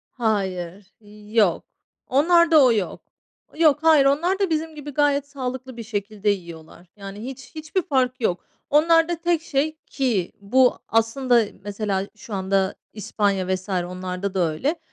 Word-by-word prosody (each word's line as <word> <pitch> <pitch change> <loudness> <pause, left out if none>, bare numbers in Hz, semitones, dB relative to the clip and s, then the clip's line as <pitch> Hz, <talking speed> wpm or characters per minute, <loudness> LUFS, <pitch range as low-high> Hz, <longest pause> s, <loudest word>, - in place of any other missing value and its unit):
Hayır, 195 -4 -2 0.4
yok. 205 -7 +3 0.4
Onlarda 325 +1 +5
o 245 - +5
yok. 205 -5 -2 0.5
Yok, 305 -2 +4
hayır 315 -4 +6
onlar 340 +8 +2
da, 390 -4 0
bizim 315 0 -2
gibi, 295 -1 -8
gayet 285 0 +1
sağlıklı 260 -2 -6
bir 230 - -6
şekilde 210 -1 -4
yiyorlar, 170 -3 -7
yani, 200 +2 -9
hiç, 265 +2 -9
hiçbir 315 +4 -2
fark 255 -3 0
yok 180 -6 -1 0.3
onlarda 330 +3 +4
tek 340 -1 0
şey, 310 +1 -1
ki 235 -10 -1
bu 250 +5 +3
aslında, 230 +1 +2 0.2
mesela, 200 -1 -2
şu 210 0 -9
anda 190 0 0 0.2
İspanya 200 -2 -1
vs. 185 +2 -7
onlarda 185 +1 -3
da 190 - 0
öyle, 285 - -2
240 Hz, 140 wpm, -23 LUFS, 195-295 Hz, 0.5 s, hayır